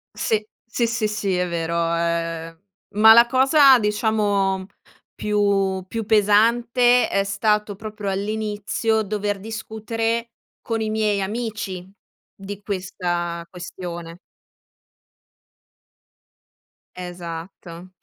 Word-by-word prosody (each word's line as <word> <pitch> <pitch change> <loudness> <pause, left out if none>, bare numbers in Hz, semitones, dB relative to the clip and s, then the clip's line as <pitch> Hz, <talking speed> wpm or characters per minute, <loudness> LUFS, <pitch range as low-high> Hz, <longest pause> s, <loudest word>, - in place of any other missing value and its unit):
Sì, 215 -1 0 0.2
sì, 235 +1 -1
sì, 225 -2 0
sì, 205 -3 -1
è 180 0 0
vero, 170 -1 -2 0.2
ehm, 165 -1 -2 0.4
ma 220 +1 +9
la 235 +1 +8
cosa 270 +2 +6
diciamo 210 -3 0 0.5
più 200 -2 0
più 225 +2 -4
pesante, 235 +4 +4
è 195 - +1
stato 210 +1 0
proprio 210 0 -6
all'inizio 215 +2 -1
dover 205 -1 -2
discutere 225 +2 -3 0.3
con 225 -1 -2
i 220 - -1
miei 215 -2 0
amici 205 -3 -4 0.4
di 200 +1 -8
questa 175 -4 -3
questione. 175 -1 -8 2.8
Esatto, 175 0 -8
205 Hz, 95 wpm, -22 LUFS, 185-220 Hz, 2.8 s, ma